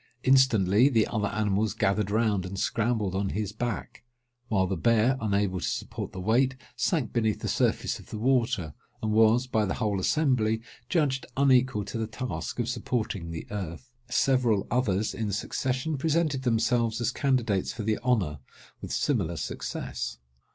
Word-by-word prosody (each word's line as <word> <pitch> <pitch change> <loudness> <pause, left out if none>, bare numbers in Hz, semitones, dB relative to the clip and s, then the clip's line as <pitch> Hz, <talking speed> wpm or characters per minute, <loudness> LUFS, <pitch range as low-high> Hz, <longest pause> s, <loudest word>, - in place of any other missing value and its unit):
Instantly 125 -3 +5
the 115 -5 +3
other 105 -3 -1
animals 105 0 0
gathered 100 +1 +1
round 105 -3 +1
and 95 +2 -6
scrambled 110 -4 0
on 95 0 -1
his 105 0 -2
back; 115 +1 -4 0.5
while 100 -5 +2
the 95 +1 -1
bear, 115 +6 +3
unable 100 -3 0
to - - -3
support - - -4
the 95 - -7
weight, 125 +7 +2 0.2
sank 155 - 0
beneath 110 -3 0
the - - -3
surface - - 0
of - - -15
the - - -5
water, 115 - +1 0.3
and 110 - 0
was, 110 +3 +4
by 110 -4 +1
the 95 - -1
whole 105 -4 0
assembly, 115 -2 +2 0.3
judged 145 -6 +1
unequal 130 -6 +3
to 115 - -5
the 110 - -1
task 125 +3 -5
of 120 -2 -1
supporting 120 -7 -2
the 80 -1 -6
earth. 95 0 -6 0.2
Several 125 -6 +2
others 110 -4 +1
in 110 -2 -2
succession 130 +8 -2
presented 155 -2 +1
themselves 115 -1 +1
as 120 0 0
candidates 120 -9 0
for 115 - -6
the 110 0 0
honour, 105 - 0 0.4
with - - -7
similar 95 - 0
success. 60 -3 -4
110 Hz, 160 wpm, -27 LUFS, 100-125 Hz, 0.5 s, Instantly